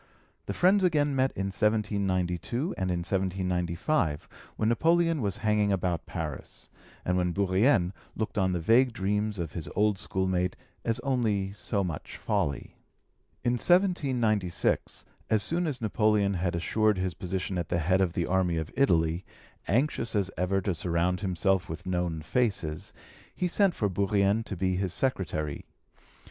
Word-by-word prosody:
The -, -, -3 dB
friends 190 Hz, +2 st, +4 dB
again 150 Hz, -5 st, +2 dB
met 130 Hz, 0 st, +3 dB
in 95 Hz, 0 st, -3 dB
1792 100 Hz, -, 0 dB
and 95 Hz, -1 st, -2 dB
in 90 Hz, -1 st, -1 dB
1795, 90 Hz, -, -1 dB, 0.3 s
when 110 Hz, -, 0 dB
Napoleon 165 Hz, +4 st, +2 dB
was 100 Hz, -3 st, -1 dB
hanging 105 Hz, -1 st, +3 dB
about 90 Hz, -4 st, -1 dB
Paris, -, -, -6 dB, 0.4 s
and 90 Hz, 0 st, +1 dB
when 90 Hz, -1 st, +1 dB
Bourrienne 100 Hz, 0 st, +2 dB, 0.2 s
looked 110 Hz, -, -3 dB
on 95 Hz, -2 st, +2 dB
the 90 Hz, -, -1 dB
vague 115 Hz, +8 st, +4 dB
dreams 105 Hz, 0 st, -1 dB
of 85 Hz, -4 st, -4 dB
his 85 Hz, -4 st, -6 dB
old 105 Hz, -2 st, +2 dB
schoolmate 95 Hz, -1 st, 0 dB, 0.3 s
as 115 Hz, -, 0 dB
only 110 Hz, -8 st, 0 dB
so 100 Hz, 0 st, -2 dB
much 85 Hz, -5 st, -5 dB
folly. 70 Hz, -, -2 dB, 0.7 s
In 120 Hz, -, +2 dB
1796, 125 Hz, -, +1 dB, 0.2 s
as 110 Hz, -1 st, +3 dB
soon 175 Hz, +1 st, 0 dB
as 140 Hz, -5 st, -3 dB
Napoleon 105 Hz, -2 st, +2 dB
had 90 Hz, -1 st, -1 dB
assured 105 Hz, +5 st, +1 dB
his 90 Hz, -1 st, -1 dB
position 90 Hz, +1 st, -3 dB
at 85 Hz, -, -4 dB
the 85 Hz, -, +1 dB
head 90 Hz, +3 st, +2 dB
of 90 Hz, -3 st, +1 dB
the 85 Hz, -, 0 dB
army 90 Hz, -2 st, +1 dB
of 80 Hz, -1 st, -4 dB
Italy, 85 Hz, -9 st, +2 dB, 0.4 s
anxious 120 Hz, -1 st, 0 dB
as 100 Hz, -2 st, +1 dB
ever 95 Hz, +2 st, 0 dB
to 95 Hz, 0 st, -1 dB
surround 90 Hz, +2 st, 0 dB
himself 95 Hz, 0 st, 0 dB
with 80 Hz, +3 st, -6 dB
known 90 Hz, -3 st, -2 dB
faces, 90 Hz, -8 st, -1 dB, 0.4 s
he 180 Hz, -, 0 dB
sent 190 Hz, 0 st, +2 dB
for 105 Hz, -, +1 dB
Bourrienne 100 Hz, +2 st, +1 dB
to 100 Hz, -, -5 dB
be 95 Hz, +1 st, 0 dB
his 95 Hz, -2 st, -1 dB
secretary. 80 Hz, -, -2 dB
95 Hz, 155 wpm, -28 LUFS, 90-110 Hz, 0.7 s, friends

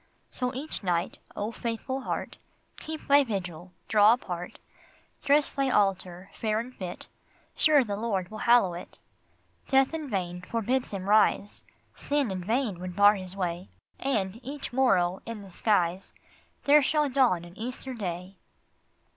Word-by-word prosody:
So 250 Hz, -1 st, -2 dB
each 290 Hz, +4 st, -2 dB
night, 175 Hz, -2 st, -1 dB, 0.2 s
O 210 Hz, +2 st, -3 dB
faithful 235 Hz, +4 st, -4 dB
heart, -, -, -4 dB, 0.4 s
Keep 315 Hz, 0 st, -7 dB
thy 285 Hz, 0 st, +6 dB
vigil, 180 Hz, -6 st, -5 dB, 0.2 s
draw 215 Hz, +1 st, +6 dB
apart, 180 Hz, -7 st, -5 dB, 0.7 s
Dress 290 Hz, +1 st, +3 dB
thy 275 Hz, -1 st, 0 dB
altar 190 Hz, -4 st, 0 dB
fair 215 Hz, -1 st, -1 dB
and 250 Hz, +2 st, -7 dB
fit, 180 Hz, -2 st, -7 dB, 0.5 s
Sure 300 Hz, -3 st, +5 dB
the 205 Hz, -4 st, -3 dB
Lord 200 Hz, -4 st, -2 dB
will 215 Hz, -, -7 dB
hallow 235 Hz, -7 st, +4 dB
it! 175 Hz, -, -9 dB, 0.7 s
Death 270 Hz, +2 st, +3 dB
in 310 Hz, -3 st, -4 dB
vain 180 Hz, -4 st, -3 dB
forbids 235 Hz, +6 st, -1 dB
Him 195 Hz, -2 st, -5 dB
rise, 205 Hz, -1 st, +2 dB, 0.3 s
Sin 285 Hz, -6 st, -1 dB
in 185 Hz, -1 st, -4 dB
vain 220 Hz, -2 st, -1 dB
would 180 Hz, 0 st, -6 dB
bar 205 Hz, +1 st, +7 dB
His 185 Hz, -2 st, -7 dB
way, 175 Hz, -, -3 dB, 0.3 s
And, 215 Hz, -6 st, -1 dB
each 275 Hz, 0 st, -6 dB
morrow, 190 Hz, -9 st, +2 dB
in 225 Hz, -3 st, -6 dB
the 195 Hz, -, -13 dB
skies, 185 Hz, -2 st, 0 dB, 0.5 s
There 295 Hz, +1 st, +6 dB
shall 300 Hz, +2 st, +2 dB
dawn 250 Hz, -11 st, +2 dB
an 175 Hz, +1 st, -13 dB
Easter 250 Hz, +4 st, -5 dB
day 185 Hz, -3 st, -5 dB
210 Hz, 150 wpm, -28 LUFS, 185-260 Hz, 0.7 s, bar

